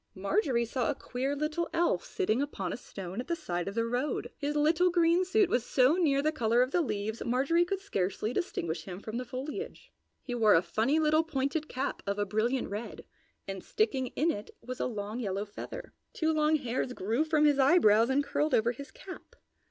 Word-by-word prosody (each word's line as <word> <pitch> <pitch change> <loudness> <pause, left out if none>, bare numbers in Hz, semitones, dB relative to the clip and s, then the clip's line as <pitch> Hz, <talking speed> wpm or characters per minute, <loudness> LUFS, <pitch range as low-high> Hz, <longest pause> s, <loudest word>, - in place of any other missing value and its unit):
Marjorie 235 - +1
saw 240 0 -1
a 290 - 0
queer 265 +3 -3
little 305 +3 -2
elf 330 - +1
sitting 215 +7 0
upon 200 -11 -3
a - - -2
stone 195 -3 -7
at - - -10
the 340 - 0
side 175 - -3
of 200 - -4
the 230 0 +1
road. 245 +5 -2
His 295 0 -3
little 320 +4 +3
green 345 +1 +3
suit 395 +2 +3
was 245 - +1
so 255 +3 +4
near 295 -6 +2
the 310 - +2
color 240 -4 +2
of 255 - -3
the 355 - +2
leaves 220 -6 -3
Marjorie 275 +8 +2
could 390 +1 -2
scarcely 210 - -2
distinguish 175 - -3
him 185 -1 -7
from 220 +2 -6
the 250 - -3
foliage. 275 - -6 0.3
He 245 - -5
wore 220 -3 +5
a 165 - +4
funny 220 - +1
little 310 0 +3
pointed 305 0 -2
cap 265 +2 -3
of 200 0 -1
a 205 - 0
brilliant 225 +6 0
red, 210 +3 -6 0.4
and 195 -1 -5
sticking 275 - 0
in 325 +4 +2
it 205 -8 -6
was 255 +1 -7
a - - 0
long 215 0 -4
yellow 200 -3 -2
feather. 205 - -8 0.2
Two 320 -1 +1
long 305 0 +3
hairs 250 -2 -2
grew 225 +7 0
from 310 -1 +2
his 290 -2 +4
eyebrows 250 -6 +5
and 275 +2 +2
curled 300 +2 +1
over 230 +2 +3
his 275 +3 -9
cap. 370 +6 -11
260 Hz, 205 wpm, -30 LUFS, 220-310 Hz, 0.4 s, wore